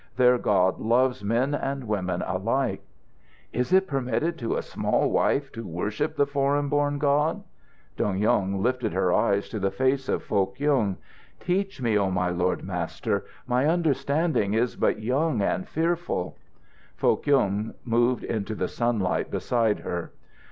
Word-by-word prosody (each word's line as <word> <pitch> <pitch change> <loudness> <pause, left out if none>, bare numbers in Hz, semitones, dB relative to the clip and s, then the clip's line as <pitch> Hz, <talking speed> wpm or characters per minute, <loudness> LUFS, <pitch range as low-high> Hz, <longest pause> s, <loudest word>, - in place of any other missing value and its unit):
Their 125 0 +4
God 95 -4 +2
loves 125 +2 +2
men 120 +7 +1
and 135 -1 -2
women 95 -5 -2
alike." 115 +8 -1 0.7
"Is 125 +7 -1
it 190 +1 +5
permitted 140 +1 -1
to 115 -3 -1
a - - -2
small - - 0
wife 140 -1 +1
to 115 - -7
worship 105 - -2
the 145 - +3
foreign 140 0 0
born 145 0 +1
God?" 150 +6 +1 0.5
Dong 95 -2 0
Yung 95 -1 +1
lifted 125 -4 0
her 90 -1 +2
eyes 100 0 +2
to 110 - -4
the 95 0 +1
face 130 +6 0
of - - 0
Foh 95 -2 +1
Kyung. 135 -10 0 0.4
"Teach 190 -4 -2
me, 110 -3 +2
O 95 -1 +1
my 90 -1 0
Lord 90 +1 0
Master! 90 -3 -2 0.2
My 125 +3 +1
understanding 155 - +1
is 120 +2 +1
but - - +1
young 130 +2 +1
and 185 - -1
fearful 170 - -1 0.3
" - - -31
Foh - - +3
Kyung 110 -7 +1
moved 120 +1 +2
into 110 -1 -3
the 90 - -1
sunlight 115 -6 0
beside 115 -4 0
her. 85 -1 -4
125 Hz, 155 wpm, -26 LUFS, 100-140 Hz, 0.7 s, it